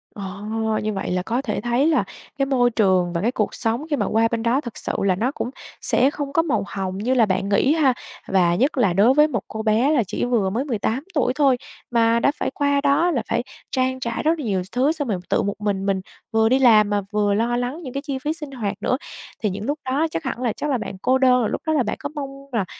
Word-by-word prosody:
Ờ, 200 0 -7 0.4
như 215 0 -1
vậy 195 -2 -3
là 180 - 0
có 235 +5 -1
thể - - -3
thấy 245 +5 +2
là 320 - +3 0.3
cái 275 - +2
môi 255 -3 +3
trường 185 -6 +2
và 170 - -1
cái 230 +5 +1
cuộc 215 -5 -1
sống 235 +6 -1
khi 295 - +1
mà 215 -7 0
qua 225 +1 +2
bên 230 -1 -1
đó 245 +5 +2
thực 235 -5 -8
sự - - -3
là 190 -2 +3
nó 235 +8 0
cũng 245 - -4 0.3
sẽ 260 +3 +3
không 285 -1 -5
có 330 - +4
màu 260 -11 0
hồng 190 -1 -4
như 240 +6 0
là 240 -4 +4
bạn 195 0 -1
nghĩ 265 +8 +3
ha. 290 -5 +3 0.3
Và 180 -3 +3
nhất 270 - +1
là 200 -8 +3
đối 210 +8 +5
với 300 +2 +5
một 305 - -3
cô 220 0 -5
bé 220 +5 +3
là 275 -7 +3
chỉ - - -2
vừa 230 -6 +1
mới 240 +8 -2
18 240 0 -1
tuổi 255 -4 +1
thôi, 275 -4 +3 0.3
mà 230 -1 +3
đã 280 - +3
phải - - -2
qua 285 -1 +1
đó 285 +5 +3
là 255 - 0
phải - - 0 0.3
trang 260 0 0
trải 235 +2 -3
rất 320 +1 +2
là 290 - -4
nhiều 195 -4 0
thứ 260 +5 +2
xong 305 -4 -3
rồi 200 -5 -1
tự - - +2
một 200 0 -1
mình 200 -2 -1
mình 195 -1 0 0.3
vừa 225 0 +3
đi 260 +1 +3
làm 215 -5 +6
mà 205 0 +1
vừa 205 -1 +1
lo 235 +3 +1
lắng 250 +7 -3
những 255 -4 -7
cái 275 - -2
chi 275 -3 -3
phí 295 +4 -2
sinh 300 -4 -7
hoạt 215 -6 -3
nữa. 255 - +1 0.5
Thì 210 - +2
những 200 +3 -5
lúc 290 +4 -2
đó 280 +5 +1
chắc 165 - -3
hẳn 240 - -4
là 240 -4 0
chắc 295 - -4
là 270 - +2
bạn 200 -4 -6
cô 260 - +3
đơn, 255 -1 +4
rồi 220 - 0
lúc - - -3
đó 315 - +2
là 280 - +2
bạn 210 - -3
có 285 - -4
mong 280 -2 -4 0.2
là 225 -6 0
240 Hz, 270 wpm, -22 LUFS, 205-275 Hz, 0.5 s, làm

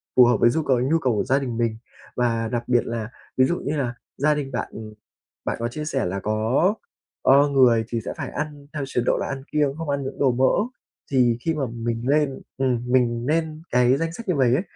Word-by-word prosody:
phù 125 - +8
hợp 120 -1 +3
với 120 - +5
du 160 +6 0
cầu 130 -4 +2
nhu 140 +6 +2
cầu 130 -6 +1
của 105 - +1
gia 135 +2 +2
đình 125 -4 -4
mình. 115 -2 0 0.4
Và 115 -2 0
đặc 120 +1 -2
biệt 120 -1 +2
là 115 -1 -4 0.3
ví 130 - +6
dụ 175 +6 -1
như 145 - -2
là 125 -4 -1 0.2
gia 150 +2 +3
đình 140 -2 -4
bạn, 125 - -2
ừm, 110 -1 -9 0.5
bạn - - -1
có 115 - -1
chia 150 +6 -5
sẻ 140 -3 -1
là 95 +2 -2
có, 110 - +1 0.5
ơ, 140 +2 +5
người 125 -5 +4
thì 115 - -1
sẽ - - -3
phải - - -4
ăn 145 -1 -5
theo 150 -2 -3
chế 125 - 0
độ - - +2
là - - -2
ăn 135 -1 -5
kiêng, 145 -2 +1
không 165 -2 -5
ăn 140 -1 -1
những 135 - -6
đồ 135 -2 +4
mỡ 130 - +2 0.4
thì 125 -3 +3
khi 165 +4 0
mà 150 -3 -2
mình 115 0 -3
lên, 145 -1 +1 0.2
ừm, 130 -3 0
mình 120 -2 +2
nên 155 +1 -1
cái 125 +1 +4
danh 165 +1 -2
sách 230 +5 -9
như 180 - +1
vầy 130 -3 +3
á, 160 - +1
130 Hz, 245 wpm, -23 LUFS, 120-145 Hz, 0.5 s, phù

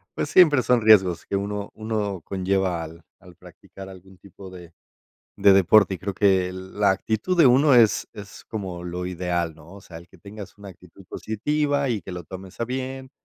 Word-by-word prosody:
Pues, - - -3
siempre 155 -7 +5
son 125 -1 +2
riesgos 95 -6 +4
que - - -4
uno, 100 +1 -4
uno 105 -4 -4
conlleva 95 -2 -2
al 80 +1 -12 0.2
al 90 -1 -17
practicar 90 +2 -14
algún 95 0 -15
tipo 100 0 -14
de 90 -2 -13 0.6
de 100 - +5
deporte. 95 +1 +4
Y - - -8
creo 100 +1 -5
que 95 -3 +1
la 95 +2 -1
actitud 110 - -2
de 165 -5 +6
uno 135 +3 +4
es 115 -3 +3
es 100 -1 -12
como 95 -5 -7
lo 90 +1 -5
ideal, 85 -2 -3
¿no? 80 +2 -17
O 100 - -13
sea, 90 -3 -13
el 85 +1 -12
que 95 - -20
tengas 100 +2 -11
una 100 -1 -11
actitud 90 +1 -16
positiva 145 +5 -2
y 110 -6 -2
que 95 - -9
lo 90 0 -7
tomes 95 +3 -11
a - - 0
bien, 130 +1 -6
95 Hz, 195 wpm, -23 LUFS, 90-110 Hz, 0.6 s, de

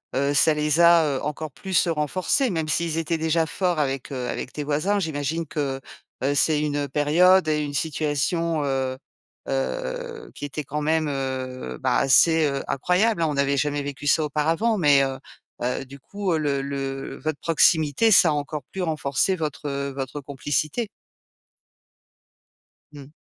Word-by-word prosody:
heu, 140 +2 +1
ça 155 +2 +4
les 150 +1 +1
a, 170 -1 +6
heu, - - -5
encore 150 +1 -4
plus 185 +4 0
renforcés, 170 - 0
même 160 -4 -2
s'ils 165 0 0
étaient 165 0 -1
déjà 160 +1 +1
forts 175 +3 -1
avec, 135 -1 -2
heu, 125 -2 -3
avec 125 - -4
tes 150 - -5
voisins. 155 +8 0
J'imagine 160 0 -2
que, 140 -3 -3 0.4
heu, 140 +1 +2
c'est 150 +1 +3
une 145 -1 -1
période 165 +6 +4
et 150 -1 +1
une 145 -1 -5
situation, 155 +2 -1
heu, 130 -1 -1 0.5
heu, 475 - -4
qui - - -6
était 145 +2 -5
quand 150 +2 -4
même, 155 +1 +1
heu, 130 -2 -4
bah, 130 -2 +1
assez, 160 +4 +4
heu, 140 -1 -2
incroyables, 180 - +1
hein. 165 - +2
On 150 - -2
n'avait 140 0 +1
jamais 145 +1 0
vécu 145 +1 -6
ça 155 +2 +4
auparavant. 160 +10 +1
Mais, 145 -4 +5
heu, 135 -1 -3 0.4
heu, 125 +2 -2
du 135 +1 -12
coup, 200 +4 -3
le 140 -3 0
le 135 -1 -5
votre 155 -2 -3
proximité, 160 +4 +3
ça 180 -4 +7
a - - +2
encore 145 0 -3
plus 190 - -4
renforcé 155 +3 0
votre, 150 -3 -4
heu, 140 0 -3
votre 135 +1 -4
complicité. 145 - -2 2.0
Mmh. 145 0 -12
150 Hz, 165 wpm, -24 LUFS, 140-165 Hz, 2.0 s, ça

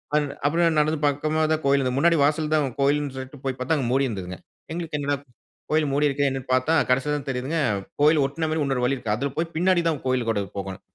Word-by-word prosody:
An 150 -1 +2 0.2
அப்புறம் 165 +2 +2
நடந்து 150 0 +1
பக்கமா 155 +2 0
தான் 155 0 +1
கோவில் 140 0 +4
இருந்தது. 130 -1 -1
முன்னாடி 170 +2 +4
வாசல்ல 150 +1 +1
தான் 150 -3 +2
கோவில்னு 140 0 +1
சொல்ட்டு 130 +1 -8
போய் 130 -1 -2
பார்த்தா, 130 +5 +1
அங்க 130 -4 -1
மூடியிருந்ததுங்க. 105 -9 -1 0.3
எங்களுக்கு 165 -3 -3
என்னடா 145 0 0 0.5
கோவில் 155 -1 +2
மூடியிருக்குதே 145 -1 +2
என்னனு 130 -1 -5
பார்த்தா 130 +5 +2 0.2
கடைசியில 135 +4 +2
தான் 140 -1 -8
தெரியுதுங்க. 135 +5 -2 0.4
கோவில் 150 0 +5
ஒட்ன 160 +4 -2
மாரி 160 -1 0
இன்னொரு 135 -3 -1
வழி 135 - +1
இருக்கு. 110 -4 -2
அதுல 140 +5 -2
போய் 165 +1 -2
பின்னாடி 180 +1 +3
தான் 155 -4 -2
கோவிலுக்குள்ள 120 -5 0 0.2
போகணும். 95 -1 -5
145 Hz, 205 wpm, -24 LUFS, 130-155 Hz, 0.5 s, கோவில்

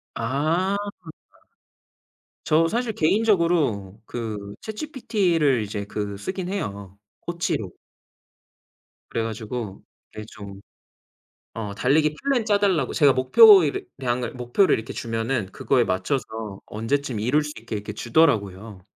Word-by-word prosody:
아. 155 +11 0 1.7
저 160 +1 +4
사실 235 +3 -1
개인적으로 165 - +1
그 105 -4 -5
ChatGPT를 200 - 0
이제 100 0 -4
그 105 -1 -4
쓰긴 185 - -4
해요, 100 - -5 0.2
코치로. 165 - -2 1.4
그래 115 - -1
가지고 110 -2 -5 0.3
네 110 - -6
좀 100 -2 -10 1.0
어 105 -3 -4
달리기 150 +8 +2
플랜 275 -4 +1
짜 210 -2 +2
달라고 180 -10 +1
제가 145 -4 +4
목표 190 - +8
이렇 145 - -1 0.2
량을 125 -1 -2
목표를 125 +10 +2
이렇게 110 - -6
주면은 115 -2 -2
그거에 - - +2
맞춰서 110 +7 -1 0.4
언제쯤 115 +1 -2
이룰 135 +7 +2
수 150 - -6
있게 110 0 -6
이렇게 105 +1 -6
주더라고요. 105 - 0
130 Hz, 265 characters per minute, -24 LUFS, 105-170 Hz, 1.7 s, 목표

